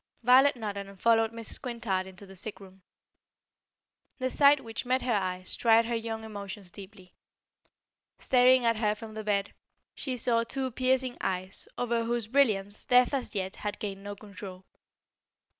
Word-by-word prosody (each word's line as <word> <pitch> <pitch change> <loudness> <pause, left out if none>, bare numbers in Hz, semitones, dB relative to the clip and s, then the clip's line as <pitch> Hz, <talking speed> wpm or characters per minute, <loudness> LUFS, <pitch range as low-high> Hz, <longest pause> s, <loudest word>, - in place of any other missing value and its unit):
Violet 260 +4 +6
nodded 200 -4 -5
and 195 -1 -15
followed 225 0 +3
Mrs. 230 -1 -6
Quintard 225 -7 -2
into 190 +1 -12
the 195 0 -13
sick 205 +3 -5
room. 190 -1 -15 1.4
The 255 -1 -2
sight 285 0 +5
which 225 -1 -5
met 255 +1 0
her 250 - 0
eyes 185 -2 +1
tried 230 0 +4
her 235 +1 -1
young 225 -1 -4
emotions 200 -3 -8
deeply. 190 -2 -13 1.0
Staring 255 -1 +4
at 230 -1 +2
her 210 -1 +1
from 215 0 -10
the 215 0 -6
bed, 205 -1 -1 0.4
she 260 -3 -4
saw 230 -1 +2
two 260 +2 -3
piercing 255 0 0
eyes 185 0 -3
over 235 -1 0
whose 235 -1 -1
brilliance 215 -5 +1
death 250 +2 +4
as 265 -5 -3
yet 190 0 -3
had 210 -1 -4
gained 195 -2 -5
no 205 0 -6
control. 195 -2 -10
220 Hz, 160 wpm, -29 LUFS, 200-245 Hz, 1.4 s, Violet